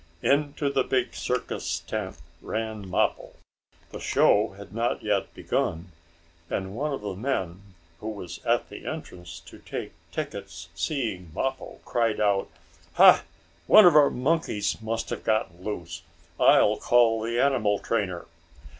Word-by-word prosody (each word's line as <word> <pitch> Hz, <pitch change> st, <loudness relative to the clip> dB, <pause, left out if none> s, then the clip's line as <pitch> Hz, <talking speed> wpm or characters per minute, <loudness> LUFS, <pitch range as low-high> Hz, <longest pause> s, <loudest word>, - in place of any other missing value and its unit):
Into 145 Hz, 0 st, +1 dB
the 135 Hz, -2 st, +2 dB
big 130 Hz, -1 st, 0 dB
circus 125 Hz, 0 st, -3 dB
tent -, -, -5 dB, 0.2 s
ran 110 Hz, -3 st, -4 dB
Mappo. -, -, 0 dB, 0.6 s
The -, -, -7 dB
show 105 Hz, -1 st, +3 dB
had 100 Hz, -2 st, -11 dB
not 115 Hz, +2 st, -1 dB
yet -, -, 0 dB
begun, 85 Hz, +3 st, -2 dB, 0.6 s
and 95 Hz, 0 st, -3 dB
one 150 Hz, +5 st, -2 dB
of 135 Hz, -, -4 dB
the 100 Hz, -2 st, -4 dB
men 95 Hz, -5 st, -3 dB, 0.4 s
who 110 Hz, -, -5 dB
was 100 Hz, -5 st, -8 dB
at -, -, +1 dB
the -, -, -10 dB
entrance 85 Hz, -2 st, -7 dB
to 85 Hz, -, -14 dB
take -, -, -6 dB, 0.2 s
tickets 100 Hz, -, -6 dB
seeing 90 Hz, -, -3 dB
Mappo, 135 Hz, 0 st, -3 dB
cried 115 Hz, -3 st, 0 dB
out: 100 Hz, -2 st, +1 dB, 0.4 s
"Ha! -, -, +7 dB, 0.4 s
One 215 Hz, -, +9 dB
of 175 Hz, -, +7 dB
our 145 Hz, -2 st, +7 dB
monkeys 125 Hz, -7 st, -1 dB
must 115 Hz, +1 st, -3 dB
have -, -, -4 dB
gotten 110 Hz, -5 st, -1 dB
loose. 85 Hz, -5 st, -5 dB, 0.4 s
I -, -, +6 dB
will -, -, +2 dB
call 115 Hz, -2 st, +3 dB
the 115 Hz, +2 st, -1 dB
animal 120 Hz, -8 st, +2 dB
trainer." 95 Hz, -6 st, -2 dB
110 Hz, 145 wpm, -26 LUFS, 95-130 Hz, 0.6 s, One